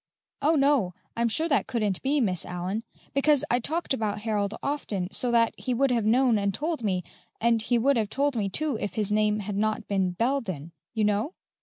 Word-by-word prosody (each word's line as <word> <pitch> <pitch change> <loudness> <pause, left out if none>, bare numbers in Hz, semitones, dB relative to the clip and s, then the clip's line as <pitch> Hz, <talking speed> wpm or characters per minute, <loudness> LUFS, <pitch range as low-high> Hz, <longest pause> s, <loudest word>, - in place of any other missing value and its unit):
"Oh, 305 +4 +3
no; 275 - +2 0.2
I'm 235 0 +1
sure 320 +9 +1
that 280 -4 +1
couldn't 210 -6 -1
be, 285 +2 +1
Miss 185 -9 +1
Allyn! 180 +4 -3 0.3
Because 280 +1 +3
I 245 - +3
talked 315 +5 -2
about 210 -4 -2
Harold 210 -1 -1
often, 210 -10 -2
so 250 - +1
that 230 -1 +3
he 250 - -1
would 270 +2 +2
have 230 -3 +1
known 240 0 +4
and 200 0 +1
told 310 - -2
me, 185 -4 0 0.4
and 230 -1 +3
he 240 +2 +1
would 270 +3 +3
have 215 -3 0
told 280 +2 0
me, 205 -3 0
too, 285 +2 0
if 205 - -3
his 210 -2 0
name 210 0 +2
had 205 0 -4
not 215 +1 -1
been 190 -3 0
Bel 255 +8 +1
den, 170 - -6 0.2
you 220 - +1
know." 210 - 0
225 Hz, 210 wpm, -27 LUFS, 205-270 Hz, 0.4 s, known